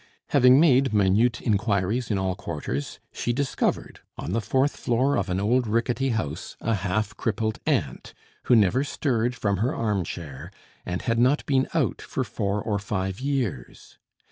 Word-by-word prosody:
Having 130 Hz, -1 st, +6 dB
made 135 Hz, -6 st, +4 dB
minute 105 Hz, +5 st, +3 dB
inquiries 105 Hz, +1 st, 0 dB
in 105 Hz, -, +1 dB
all 95 Hz, -1 st, 0 dB
quarters, 75 Hz, -5 st, -5 dB, 0.2 s
she 120 Hz, -, -1 dB
discovered, 135 Hz, +2 st, -1 dB, 0.2 s
on -, -, -5 dB
the 115 Hz, -, 0 dB
fourth 130 Hz, +7 st, +1 dB
floor 130 Hz, +4 st, +1 dB
of 100 Hz, 0 st, -1 dB
an 90 Hz, +1 st, 0 dB
old 120 Hz, +4 st, +1 dB
rickety 120 Hz, +4 st, 0 dB
house, 85 Hz, -, -3 dB
a 115 Hz, -, -1 dB
half 105 Hz, +2 st, -1 dB
crippled 110 Hz, 0 st, -1 dB
aunt, -, -, -1 dB, 0.3 s
who 125 Hz, -, +5 dB
never 110 Hz, +5 st, +3 dB
stirred 125 Hz, -4 st, -1 dB
from 100 Hz, -4 st, 0 dB
her 125 Hz, -, 0 dB
arm 105 Hz, -, 0 dB
chair, 75 Hz, -5 st, -7 dB, 0.4 s
and 90 Hz, 0 st, -3 dB
had 115 Hz, 0 st, 0 dB
not 130 Hz, +5 st, +3 dB
been 135 Hz, -2 st, +2 dB
out -, -, 0 dB
for -, -, -3 dB
four 100 Hz, +1 st, -2 dB
or 105 Hz, -3 st, -1 dB
five 95 Hz, -2 st, -3 dB
years. 125 Hz, -, -4 dB
110 Hz, 165 wpm, -25 LUFS, 95-125 Hz, 0.4 s, Having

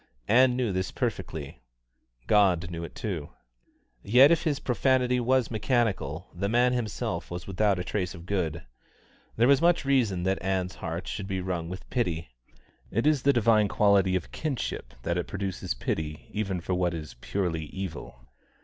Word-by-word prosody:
Ann 125 Hz, +2 st, +5 dB
knew 125 Hz, -4 st, 0 dB
this 95 Hz, 0 st, -1 dB
perfectly. 70 Hz, -3 st, -4 dB, 0.6 s
God 90 Hz, -5 st, +3 dB
knew 85 Hz, 0 st, -5 dB
it 85 Hz, -, -8 dB
too. 85 Hz, -9 st, -4 dB, 0.7 s
Yet 125 Hz, -, +6 dB
if 170 Hz, -, +2 dB
his 145 Hz, -4 st, +1 dB
profanity 125 Hz, 0 st, +2 dB
was 125 Hz, -1 st, +2 dB
mechanical, 105 Hz, -, 0 dB
the 100 Hz, +3 st, -2 dB
man 120 Hz, +2 st, +3 dB
himself 120 Hz, -4 st, -3 dB
was 90 Hz, -1 st, -6 dB
without 100 Hz, 0 st, +1 dB
trace 90 Hz, 0 st, -2 dB
of 85 Hz, +1 st, -11 dB
good. 85 Hz, -4 st, -2 dB, 0.7 s
There 120 Hz, +2 st, +4 dB
was 140 Hz, +1 st, +5 dB
much 170 Hz, -3 st, +3 dB
reason 115 Hz, -10 st, +2 dB
that 95 Hz, +1 st, 0 dB
Ann's 95 Hz, 0 st, -1 dB
heart 85 Hz, +1 st, -5 dB
should 100 Hz, +2 st, -4 dB
be 95 Hz, -1 st, -2 dB
wrung 90 Hz, -2 st, -3 dB
with 90 Hz, +1 st, -8 dB
pity. 85 Hz, -, -1 dB, 0.6 s
It 115 Hz, -, 0 dB
is 150 Hz, -3 st, +3 dB
the 140 Hz, -, +4 dB
divine 115 Hz, -4 st, +4 dB
quality 100 Hz, -2 st, +3 dB
of 90 Hz, -, -3 dB
kinship 135 Hz, -, -4 dB
that 85 Hz, +4 st, 0 dB
it 90 Hz, -, -3 dB
produces 95 Hz, -9 st, -3 dB
pity 75 Hz, +4 st, -4 dB
even 95 Hz, -4 st, -2 dB
for 90 Hz, -, -2 dB
what 90 Hz, -1 st, +1 dB
is 75 Hz, -2 st, -7 dB
purely 85 Hz, -5 st, -2 dB
evil. 80 Hz, -9 st, -7 dB
95 Hz, 165 wpm, -27 LUFS, 85-120 Hz, 0.7 s, Yet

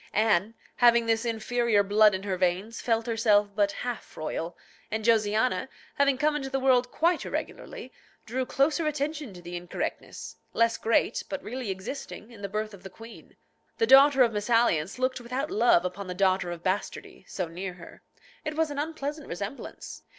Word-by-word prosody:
Anne, 215 Hz, 0 st, +2 dB, 0.2 s
having 235 Hz, -1 st, +5 dB
this 225 Hz, 0 st, +1 dB
inferior 230 Hz, -1 st, +1 dB
blood 210 Hz, 0 st, +5 dB
in 190 Hz, -, -5 dB
her 195 Hz, -2 st, -1 dB
veins, 185 Hz, +5 st, -1 dB
felt 225 Hz, -2 st, +1 dB
herself 215 Hz, -3 st, +3 dB
but 205 Hz, -1 st, +2 dB
half 245 Hz, +3 st, -6 dB
royal, 165 Hz, +2 st, -4 dB, 0.3 s
and 220 Hz, 0 st, -3 dB
Josiana, 225 Hz, +3 st, +2 dB, 0.2 s
having 280 Hz, -2 st, +2 dB
come 295 Hz, +2 st, +1 dB
into 270 Hz, -2 st, -3 dB
the 270 Hz, 0 st, -1 dB
world 255 Hz, -2 st, +3 dB
quite 340 Hz, +5 st, +1 dB
irregularly, -, -, -6 dB, 0.3 s
drew 255 Hz, +4 st, -2 dB
closer 300 Hz, +5 st, +1 dB
attention 300 Hz, -3 st, -2 dB
to 180 Hz, -2 st, -12 dB
the 175 Hz, +1 st, -7 dB
incorrectness, 175 Hz, 0 st, -5 dB, 0.2 s
less 230 Hz, 0 st, +3 dB
great, 225 Hz, -, +1 dB
but 285 Hz, -1 st, -4 dB
really 245 Hz, 0 st, -5 dB
existing, 215 Hz, +4 st, -6 dB
in 225 Hz, -3 st, -13 dB
the 200 Hz, -, -4 dB
birth 215 Hz, +1 st, -3 dB
of 195 Hz, -, -12 dB
the 190 Hz, -, -9 dB
queen. 225 Hz, +5 st, -14 dB, 0.4 s
The 225 Hz, -, +3 dB
daughter 270 Hz, +2 st, +7 dB
of 235 Hz, -, +2 dB
mésalliance 210 Hz, -6 st, +1 dB
looked 255 Hz, 0 st, -1 dB
without 255 Hz, +5 st, -3 dB
love 215 Hz, -6 st, +4 dB
upon 185 Hz, +2 st, -4 dB
the 180 Hz, -, -5 dB
daughter 185 Hz, -1 st, +2 dB
of 175 Hz, -1 st, -6 dB
bastardy, 190 Hz, +2 st, -3 dB
so 180 Hz, -3 st, -3 dB
near 180 Hz, +3 st, -6 dB
her. 170 Hz, -2 st, -13 dB, 0.4 s
It 305 Hz, -1 st, -4 dB
was 320 Hz, -1 st, +1 dB
an 285 Hz, -, -4 dB
unpleasant 300 Hz, -1 st, -4 dB
resemblance. 200 Hz, +9 st, -7 dB
225 Hz, 175 wpm, -27 LUFS, 195-260 Hz, 0.4 s, daughter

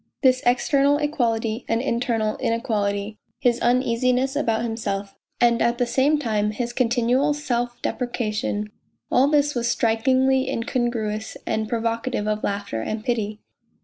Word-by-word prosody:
This 255 Hz, -1 st, +4 dB
external 280 Hz, +3 st, +3 dB
equality 235 Hz, -6 st, -1 dB
and 225 Hz, -, +1 dB
internal 235 Hz, -3 st, 0 dB
inequality, 215 Hz, -4 st, -1 dB, 0.2 s
his 240 Hz, -1 st, +2 dB
uneasiness 250 Hz, +2 st, +2 dB
about 225 Hz, -4 st, 0 dB
himself 205 Hz, -4 st, -3 dB, 0.3 s
and 235 Hz, -1 st, +3 dB
at 235 Hz, 0 st, +2 dB
the 245 Hz, -, +1 dB
same 275 Hz, +5 st, +2 dB
time 215 Hz, -7 st, 0 dB
his 240 Hz, +3 st, -3 dB
continual 250 Hz, +4 st, +2 dB
self 245 Hz, -4 st, -2 dB
depreciation 215 Hz, -4 st, -2 dB, 0.4 s
all 265 Hz, +2 st, +4 dB
this 290 Hz, 0 st, +2 dB
was 240 Hz, -1 st, -1 dB
strikingly 260 Hz, +3 st, +2 dB
incon 240 Hz, -1 st, -1 dB
gruous 215 Hz, -2 st, -4 dB
and 220 Hz, 0 st, -1 dB
provocative 230 Hz, -1 st, -1 dB
of 215 Hz, 0 st, -1 dB
laughter 200 Hz, -, -2 dB
and 215 Hz, -, -4 dB
pity. 215 Hz, -4 st, -2 dB
235 Hz, 135 wpm, -23 LUFS, 220-255 Hz, 0.4 s, This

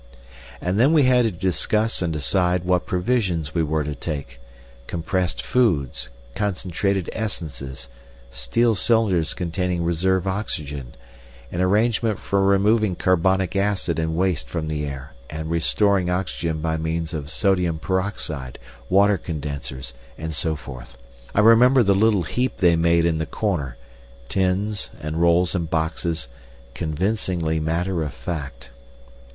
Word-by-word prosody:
And 90 Hz, +4 st, 0 dB
then 135 Hz, +7 st, +5 dB
we 155 Hz, -3 st, +5 dB
had 125 Hz, -2 st, +4 dB
to 110 Hz, -, +1 dB
discuss 95 Hz, +5 st, +1 dB
and 85 Hz, -2 st, 0 dB
decide 90 Hz, +3 st, +1 dB
what 90 Hz, 0 st, +1 dB
provisions 90 Hz, -6 st, 0 dB
we 85 Hz, -, +1 dB
were 80 Hz, 0 st, 0 dB
to 75 Hz, +1 st, -3 dB
take—compressed 60 Hz, +5 st, -5 dB
foods, 80 Hz, -, +1 dB, 0.2 s
concentrated 95 Hz, -1 st, -1 dB
essences, 75 Hz, -, -5 dB, 0.4 s
steel 60 Hz, -, +1 dB
cylinders 95 Hz, -5 st, +2 dB
containing 90 Hz, 0 st, -1 dB
reserve 90 Hz, +2 st, +1 dB
oxygen, 75 Hz, -, -4 dB, 0.6 s
an 90 Hz, -, -2 dB
arrangement 110 Hz, +2 st, +2 dB
for 100 Hz, 0 st, 0 dB
removing 100 Hz, +1 st, +3 dB
carbonic 95 Hz, +1 st, +2 dB
acid 95 Hz, -4 st, 0 dB
and 80 Hz, 0 st, -1 dB
waste 90 Hz, -2 st, 0 dB
from 80 Hz, -2 st, -3 dB
the 75 Hz, -1 st, -2 dB
air 70 Hz, 0 st, -7 dB, 0.2 s
and 80 Hz, +1 st, -5 dB
restoring 90 Hz, +3 st, +2 dB
oxygen 85 Hz, -3 st, -2 dB
by 80 Hz, 0 st, 0 dB
means 80 Hz, +1 st, -2 dB
of 75 Hz, -2 st, -4 dB
sodium 90 Hz, -2 st, +1 dB
peroxide, 80 Hz, -8 st, -3 dB, 0.3 s
water 100 Hz, +1 st, +4 dB
condensers, 70 Hz, -5 st, -5 dB, 0.2 s
and 80 Hz, 0 st, -4 dB
so 80 Hz, +1 st, +1 dB
forth. 60 Hz, -4 st, -10 dB, 0.4 s
I 105 Hz, -, +5 dB
remember 120 Hz, +4 st, +6 dB
the 100 Hz, -1 st, +4 dB
little 105 Hz, -1 st, +3 dB
heap 125 Hz, +10 st, -1 dB
they 85 Hz, -3 st, +4 dB
made 85 Hz, 0 st, +3 dB
in 80 Hz, -2 st, +1 dB
the 80 Hz, -, -2 dB
corner—tins, 70 Hz, -, -3 dB
and 75 Hz, +2 st, -3 dB
rolls, 85 Hz, +1 st, +3 dB
and 85 Hz, -4 st, -2 dB
boxes—convincingly 80 Hz, -, -2 dB
matter 85 Hz, +3 st, -1 dB
of 75 Hz, -3 st, -4 dB
fact. 70 Hz, -8 st, -6 dB
85 Hz, 130 wpm, -23 LUFS, 75-95 Hz, 0.6 s, remember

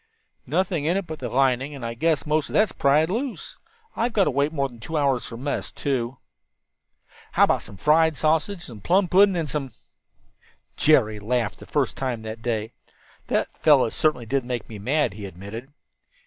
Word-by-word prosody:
"Nothing 175 Hz, -5 st, 0 dB
in 170 Hz, +4 st, +2 dB
it 195 Hz, -, -2 dB
but 160 Hz, -2 st, -7 dB
the 125 Hz, -, -4 dB
lining, 135 Hz, +3 st, +1 dB
and 130 Hz, -4 st, -7 dB
I 115 Hz, -, -3 dB
guess 160 Hz, +5 st, 0 dB
most 150 Hz, 0 st, 0 dB
of -, -, -9 dB
that's 215 Hz, -1 st, +3 dB
pried 150 Hz, +3 st, +3 dB
loose. 235 Hz, +7 st, -4 dB, 0.4 s
We've 235 Hz, +2 st, 0 dB
got 210 Hz, -3 st, +3 dB
to 150 Hz, -, +1 dB
wait 140 Hz, +3 st, +1 dB
more 140 Hz, -3 st, 0 dB
than 120 Hz, -3 st, -15 dB
two 160 Hz, +8 st, -4 dB
hours 135 Hz, -4 st, +1 dB
for 115 Hz, -, -8 dB
mess, 140 Hz, +4 st, -3 dB
too." 130 Hz, -3 st, -2 dB, 1.2 s
"How -, -, +5 dB
about -, -, +3 dB
some 100 Hz, -, -12 dB
fried 160 Hz, +3 st, +3 dB
sausage, 160 Hz, +5 st, +2 dB
and -, -, -6 dB
some 115 Hz, -8 st, -9 dB
plum 185 Hz, -, +3 dB
pudding, 195 Hz, +2 st, +5 dB
and 165 Hz, -2 st, -1 dB
some 140 Hz, -1 st, -2 dB, 0.6 s
" -, -, -35 dB
Jerry 110 Hz, -9 st, +4 dB
laughed 115 Hz, +2 st, -1 dB
for -, -, -11 dB
the -, -, -20 dB
first -, -, 0 dB
time 125 Hz, -4 st, -3 dB
that 110 Hz, +1 st, -7 dB
day. 115 Hz, -1 st, -2 dB, 0.6 s
"That -, -, -1 dB
fellow 145 Hz, -6 st, +4 dB
certainly 130 Hz, -6 st, +1 dB
did 135 Hz, +3 st, 0 dB
make 120 Hz, -3 st, -4 dB
me 110 Hz, -2 st, -9 dB
mad," 140 Hz, +3 st, +1 dB
he 100 Hz, -1 st, -7 dB
admitted. 100 Hz, -, -9 dB
140 Hz, 200 wpm, -24 LUFS, 120-160 Hz, 1.2 s, How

